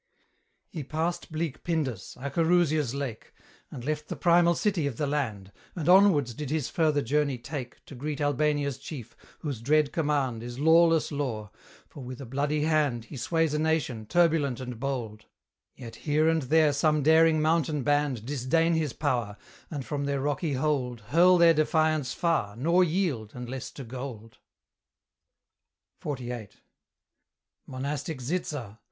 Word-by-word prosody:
He 160 -5 -6
passed 165 +5 -3
bleak 155 -3 -3
Pindus, 140 - -2
Acherusia's 155 -1 +1
lake, 135 -6 -6 0.3
And 120 - -8
left 150 0 -2
the - - -4
primal 170 0 +4
city 180 -5 0
of 130 -5 -5
the 150 - 0
land, 115 -10 -3 0.2
And 165 -4 -4
onwards 180 -9 +5
did 145 +3 -6
his 155 -2 -1
further 155 -3 +1
journey 140 +1 +1
take 125 0 -7
To - - -12
greet 145 +3 -4
Albania's 145 -1 0
chief, 130 -5 -8 0.3
whose 140 -7 -4
dread 150 +3 +2
command 145 -7 0
Is 120 +1 -7
lawless 165 +2 +4
law; 120 -8 -3 0.4
for 140 - -11
with 125 0 -8
a 135 - -7
bloody 145 +4 -1
hand 150 -7 +1
He 145 - -10
sways 160 +4 0
a 150 - 0
nation, 155 -9 -1
turbulent 160 -6 +2
and 125 -3 -6
bold: 120 -6 -4 0.5
Yet 120 -3 -10
here 155 +1 +1
and 160 0 +2
there 150 +2 +3
some 150 +1 +2
daring 160 +1 +5
mountain 155 -2 +1
band 145 -5 0
Disdain 145 +5 +1
his 155 -6 0
power, 115 -5 -1 0.3
and 145 -6 -5
from 145 -1 -3
their 140 -1 -1
rocky 145 +2 -1
hold 130 -4 -1
Hurl 180 +5 +6
their 170 -1 +6
defiance 155 -3 +1
far, 155 -12 0
nor 170 +9 +3
yield, 155 - -1
unless 125 +1 -6
to 140 - -8
gold. 120 -3 -8 1.6
XLVIII. 125 -6 -5 1.2
Monastic 140 +3 -4
Zitza! 130 - -4
145 Hz, 145 wpm, -27 LUFS, 125-160 Hz, 1.6 s, Hurl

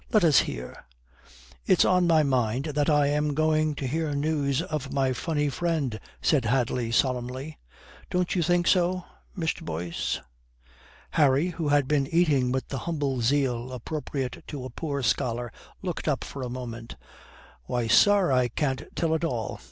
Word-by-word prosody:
Let 215 - +4
us 155 -4 +6
hear." 60 0 -5 0.8
"It's - - +5
on 180 -1 +3
my 160 -2 +5
mind 130 -1 0
that 145 +2 +1
I 145 -1 +4
am 150 0 0
going 155 0 +2
to 140 - -4
hear 150 +2 -1
news 145 0 0
of 150 -6 -4
my 135 -2 +1
funny 150 +3 -1
friend," 145 -5 -1 0.2
said 140 -7 +3
Hadley 120 0 0
solemnly. 130 +4 -1 0.5
"Don't 180 -1 0
you 180 - +1
think 175 +2 +2
so, 180 0 +2 0.3
Mr. 165 -2 -1
Boyce?" 85 +1 -3 0.9
Harry, 145 +2 +3
who 165 -3 -3
had 145 -2 +3
been 140 -2 +1
eating 150 -6 +2
with 130 0 -2
the 135 - -3
humble 140 -6 -1
zeal 125 -1 +1
appropriate 135 0 -4
to 140 -4 -6
a 130 - -7
poor 140 0 -3
scholar, 120 +1 0 0.3
looked 180 -4 -4
up 145 -4 0
for 140 - -7
a 125 - -3
moment: 120 -2 -7 0.7
"Why, 120 - -1
sir, 200 - +5
I 125 -1 +3
can't 130 +2 -1
tell 165 -1 +1
at 160 - -1
all. 120 -10 -2
140 Hz, 160 wpm, -26 LUFS, 125-160 Hz, 0.9 s, us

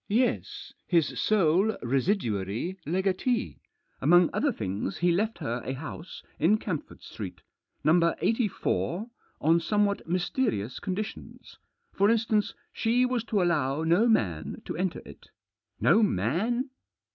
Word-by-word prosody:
"Yes; 240 +5 -1
his 170 -4 +1
sole 200 +1 +3
residuary 120 - -1
legatee. 190 +7 0 0.4
Among 175 -1 +5
other 285 0 +1
things 100 - -3
he 175 0 +2
left 210 +4 0
her 125 -7 -3
a 130 - -3
house 160 +4 -8 0.2
in 190 +8 +4
Camford 180 -8 -5
Street - - -8 0.2
— - - -48
No 165 +2 +4
84 220 -2 -1
— - - -37
on 165 +3 +4
somewhat 205 +2 0
mysterious 175 - -1
conditions. 205 +2 -6 0.3
For 200 +2 +3
instance, 220 -2 +1 0.2
she 240 +2 +2
was 250 -3 -1
to 205 -4 +1
allow 150 -4 +1
no 175 +8 +4
man 90 - 0
to - - -4
enter 185 +1 -2
it." - - -14 0.3
" 105 0 -54
No 220 - +6
man 215 - 0
180 Hz, 135 wpm, -28 LUFS, 150-215 Hz, 0.4 s, No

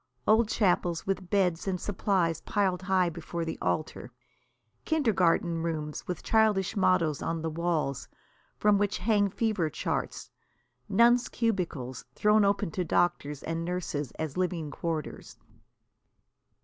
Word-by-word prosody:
Old 220 +1 +4
chapels 175 -6 +1
with 190 -2 -2
beds 185 -3 +1
and 185 -2 -1
supplies 185 -4 0
piled 190 -3 0
high 185 -2 +2
before 170 +1 -5
the 160 - -5
altar; 155 - -2 0.7
kindergarten 185 - +2
rooms 155 -2 -4
with 180 -3 -4
childish 215 -4 +2
mottoes 185 -6 +2
on 165 -1 -2
the 160 - -2
walls, 160 -5 -1 0.5
from 205 -1 +3
which 205 -1 0
hang 205 -2 +2
fever 200 -5 0
charts; - - -3 0.6
nuns' 240 +4 +4
cubicles 170 - -2
thrown 210 0 +4
open 200 -4 +1
to 180 - -2
doctors 155 -4 0
and 165 0 -3
nurses 165 -5 -3
as 160 0 -5
living 175 -5 -1
quarters. 160 -2 -5
180 Hz, 125 wpm, -29 LUFS, 165-200 Hz, 0.7 s, Old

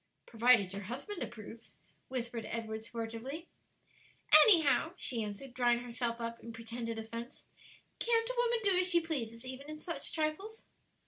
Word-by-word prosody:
"Provided 230 -4 +4
your 200 - -4
husband 255 - -5
approves," 225 0 -8 0.3
whispered 240 -3 -4
Edward 220 -1 -4
sportively. 230 +8 -6 1.0
"Anyhow," 320 - +5
she 240 -9 -1
answered, 215 +5 -7
drawing 245 -1 +3
herself 240 -1 -3
up 230 0 -4
in 230 - -9
pretended 230 0 -5
offence; 230 +2 -7 0.5
"can't 455 -1 +2
a - - -1
woman 475 -1 +2
do 395 -2 +4
as 365 0 +3
she 345 -2 +5
pleases 255 -8 -4
even 260 +3 -7
in 305 - -6
such 335 +2 -5
trifles?" 340 +8 -3
245 Hz, 145 wpm, -33 LUFS, 230-320 Hz, 1.0 s, Anyhow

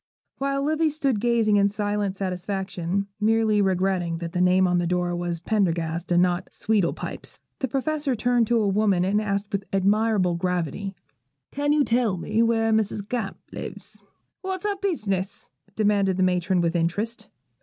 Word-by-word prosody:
While 275 0 0
Livy 310 +2 +2
stood 275 -7 0
gazing 225 -2 +3
in 200 0 +4
silent 205 -1 -2
satisfaction 190 0 -2
(merely 220 -1 +3
regretting 185 -3 0
that 170 0 -5
the 180 0 -1
name 185 +1 +4
on 180 0 +2
the 175 - 0
door 175 0 0
was 175 -1 -2
Pendergast, 170 -4 -1
not 175 0 +1
Sweedle 205 -5 +1
pipes), - - -7 0.2
the 265 - -1
Professor 280 +1 -1
turned 240 0 +2
to 240 - +2
a 215 -2 +2
woman, 195 -3 +2
and 205 +3 +2
asked 200 -1 -2
with 200 0 -1
admirable 200 -1 +2
gravity, 180 +2 -2 0.6
'Can 290 +1 0
you 295 -1 +4
tell 230 -6 +1
me 215 +6 0
where 225 -1 +2
Mrs. 215 -2 0
Gamp 230 -5 -3
lives?' - - -8 0.4
'What's 380 0 -4
her 410 -1 +1
business?' 205 - -2 0.2
demanded 200 -3 +2
the 185 - +2
matron, 180 0 +2
with 170 0 0
interest. 205 +6 -1
200 Hz, 160 wpm, -25 LUFS, 180-225 Hz, 0.6 s, in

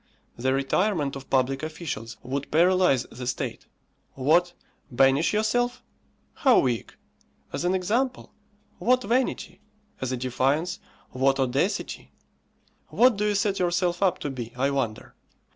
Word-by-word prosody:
The 130 +2 0
retirement 140 +3 0
of 135 -1 -9
public 135 +1 +1
officials 155 -8 -6
would 135 +3 -4
paralyse 175 -5 +3
the 125 0 -7
state. 125 - -4 0.5
What! 170 +7 +2 0.4
banish 135 +4 +3
yourself! 245 +3 0 0.5
how 260 -4 +4
weak! 120 -3 0 0.6
As - - -2
an 180 +1 +2
example? 235 +8 -1 0.5
what 255 +1 +2
vanity! 230 -5 -1 0.4
As 130 -1 -2
a 130 - -1
defiance? 135 +8 0 0.3
what 135 +1 +1
audacity! 135 +9 -1 0.8
What 250 -1 +4
do 210 +1 0
you 210 - +1
set 200 0 0
yourself 175 0 0
up 190 -3 +3
to 145 - -1
be, 120 -3 -7
I 135 +2 +1
wonder? 120 -6 -3
155 Hz, 130 wpm, -26 LUFS, 130-195 Hz, 0.8 s, how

